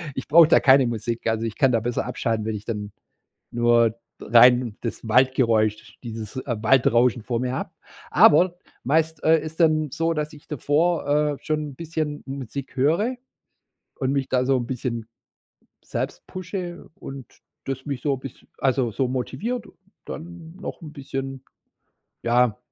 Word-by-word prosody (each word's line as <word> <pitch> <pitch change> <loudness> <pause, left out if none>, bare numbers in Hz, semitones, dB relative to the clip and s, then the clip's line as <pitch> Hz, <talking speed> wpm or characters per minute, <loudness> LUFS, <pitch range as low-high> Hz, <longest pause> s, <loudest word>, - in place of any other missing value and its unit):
Ich - - -5
brauche 165 +1 +7
da - - +6
keine 135 -1 +5
Musik. 115 0 -3
Also 115 0 0
ich 110 - -5
kann 135 -3 +4
da 115 - +2
besser 120 +2 -2
abschalten, 110 -2 -2
wenn 110 -1 -2
ich 105 0 -8
dann 105 -3 -4 0.6
nur 120 -1 +3
d 115 - -22 0.2
rein 120 -1 +5
das 115 0 -5
Waldgeräusch, 115 -3 +2
dieses, 110 -2 -7
äh, 130 -2 -2
Waldrauschen 120 0 +3
vor 120 0 -2
mir 125 +1 -2
hab. - - -5 0.4
Aber, 175 +4 +6 0.3
meist, 160 +3 +1
äh, 160 0 +5
ist 155 +2 -8
dann 155 -2 +3
so, 165 +3 0
dass 150 -1 -3
ich 150 - -15
davor, 150 +3 0
äh, 150 0 +1
schon 155 -1 -2
'n - - -14
bisschen 155 -1 -4
Musik 135 0 -6
höre 170 - +2 0.8
und 130 0 -1
mich 140 -2 -1
da 130 -1 +1
so 135 0 +3
'n 120 -1 -3
bisschen 120 -3 -4 0.8
selbst - - -4
pushe 180 -1 -6
und 135 -2 -9 0.4
das 135 -1 -4
mich 140 -3 -3
so 140 -2 +1
biss 130 -1 -11
also 130 -3 +1
so 130 +3 0
motiviert, 215 - -3 0.4
dann 165 0 -9
noch 195 - -7
'n 155 -2 -9
bisschen, 135 -2 -6 0.8
ja, 120 -1 +3
135 Hz, 160 wpm, -24 LUFS, 120-155 Hz, 0.8 s, brauche